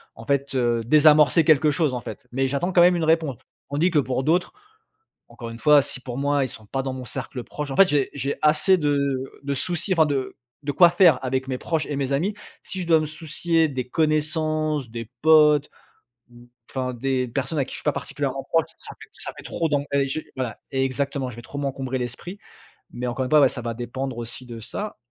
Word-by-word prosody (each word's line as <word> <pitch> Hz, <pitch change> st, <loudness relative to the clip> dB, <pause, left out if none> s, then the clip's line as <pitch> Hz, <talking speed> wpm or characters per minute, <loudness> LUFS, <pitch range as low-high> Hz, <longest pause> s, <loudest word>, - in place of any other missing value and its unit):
en 115 Hz, -, -11 dB
fait, 140 Hz, +1 st, 0 dB
heu, 120 Hz, -2 st, +1 dB
désamorcer 150 Hz, +3 st, +5 dB
quelque 155 Hz, -1 st, +4 dB
chose 150 Hz, -3 st, 0 dB
en 125 Hz, -, -3 dB
fait. 130 Hz, -, -9 dB
Mais 135 Hz, +1 st, +1 dB
j'attends 175 Hz, +7 st, -1 dB
quand 175 Hz, -, +6 dB
même 175 Hz, 0 st, +6 dB
une 165 Hz, -, -1 dB
réponse. 160 Hz, -5 st, +1 dB, 0.3 s
Tandis 155 Hz, +6 st, +2 dB
que 155 Hz, -4 st, +2 dB
pour 130 Hz, -1 st, -1 dB
d'autres, 175 Hz, +3 st, +1 dB, 0.8 s
encore 115 Hz, -2 st, -8 dB
une 115 Hz, -, -8 dB
fois 150 Hz, +2 st, +6 dB
si 135 Hz, -, -2 dB
pour 125 Hz, 0 st, -6 dB
moi 145 Hz, 0 st, +1 dB
ils -, -, -3 dB
sont 110 Hz, -2 st, -11 dB
pas 135 Hz, +3 st, -2 dB
dans 135 Hz, -1 st, -3 dB
mon 130 Hz, -1 st, -7 dB
cercle 130 Hz, -2 st, -6 dB
proche 150 Hz, -2 st, -6 dB
en -, -, -3 dB
fait 195 Hz, +4 st, +7 dB
j'ai 145 Hz, -2 st, +1 dB
j'ai 140 Hz, 0 st, -2 dB
assez 155 Hz, +5 st, +4 dB
de 145 Hz, -3 st, +1 dB, 0.4 s
de 140 Hz, 0 st, -2 dB
soucis 175 Hz, +6 st, -2 dB
enfin 160 Hz, -3 st, +4 dB
de 140 Hz, -3 st, -2 dB, 0.3 s
de 145 Hz, -, -1 dB
quoi 175 Hz, -1 st, +7 dB
faire 170 Hz, -7 st, +4 dB
avec 130 Hz, +1 st, -1 dB
mes 130 Hz, -1 st, -2 dB
proches 160 Hz, +1 st, -2 dB
et 145 Hz, -, -4 dB
mes 140 Hz, -1 st, -2 dB
amis. 170 Hz, +10 st, 0 dB, 0.3 s
Si 190 Hz, -, -5 dB
je 170 Hz, -, -5 dB
dois 160 Hz, -2 st, +5 dB
me 155 Hz, -, -2 dB
soucier 160 Hz, +1 st, 0 dB
des 130 Hz, -2 st, -4 dB
connaissances, 155 Hz, -1 st, 0 dB
des 115 Hz, -1 st, -7 dB
potes, 150 Hz, -2 st, +5 dB, 0.6 s
ou, 120 Hz, 0 st, -17 dB, 0.2 s
enfin 130 Hz, -1 st, -3 dB
des 130 Hz, +1 st, -1 dB
personnes 135 Hz, +5 st, -3 dB
avec 135 Hz, -, +1 dB
qui -, -, -9 dB
je -, -, -5 dB
suis -, -, -10 dB
pas -, -, +3 dB
particulièrement -, -, -4 dB
proche, -, -, +1 dB
ça -, -, -10 dB
fait -, -, -12 dB
ça -, -, -6 dB
fait -, -, -10 dB
trop 165 Hz, -1 st, -2 dB
d'en 145 Hz, -1 st, +1 dB
et 140 Hz, -1 st, +2 dB
je 145 Hz, +4 st, -3 dB, 0.2 s
voilà. 125 Hz, -4 st, -3 dB
Exactement, 135 Hz, 0 st, -1 dB
je 115 Hz, -, -11 dB
vais 120 Hz, -, -9 dB
trop 140 Hz, +4 st, -8 dB
m'encombrer 135 Hz, -2 st, -3 dB
l'esprit, 130 Hz, -, -6 dB, 0.5 s
mais 125 Hz, +1 st, -5 dB
encore 125 Hz, +2 st, -2 dB
une -, -, -5 dB
fois, 155 Hz, -1 st, +6 dB
ouais 135 Hz, -, +6 dB
ça 125 Hz, -, -6 dB
va 115 Hz, -1 st, -4 dB
dépendre 125 Hz, +1 st, -5 dB
aussi 120 Hz, +2 st, -7 dB
de 115 Hz, -2 st, -8 dB
ça 205 Hz, -, -6 dB
140 Hz, 230 wpm, -23 LUFS, 130-155 Hz, 0.8 s, fait